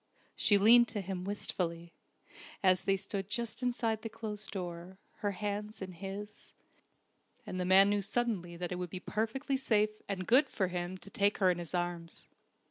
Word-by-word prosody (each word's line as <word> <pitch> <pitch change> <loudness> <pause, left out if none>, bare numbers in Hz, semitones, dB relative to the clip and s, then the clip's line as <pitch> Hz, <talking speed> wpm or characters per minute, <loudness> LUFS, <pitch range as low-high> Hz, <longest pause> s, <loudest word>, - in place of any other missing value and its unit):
She 205 - +5
leaned 235 +4 +7
to 220 -3 -3
him 185 -1 -4
wistfully, 170 -4 -2 0.7
as 185 0 +4
they 195 0 +3
stood 195 0 -4
just 235 +2 -3
inside 235 -3 0
the 225 - -5
closed 215 -2 -6
door, 180 -1 -6 0.2
her 205 -2 -1
hands 210 +2 -4
in 190 -1 -6
his; 200 +3 -8 0.9
and 185 - -5
the 180 - 0
man 190 +2 +7
knew 205 0 +2
suddenly 200 -5 -2
that 175 0 -4
it 180 - -2
would 180 -1 -3
be 185 - -5
perfectly 230 +8 -1
safe 215 -4 +1
and 185 -2 -2
good 265 +6 +5
for 190 -3 -1
him 180 +1 -3
to 200 - -11
take 200 0 +2
her 185 -2 +4
in 175 - -2
his 175 +1 -4
arms. 175 -1 -4
200 Hz, 180 wpm, -32 LUFS, 180-215 Hz, 0.9 s, leaned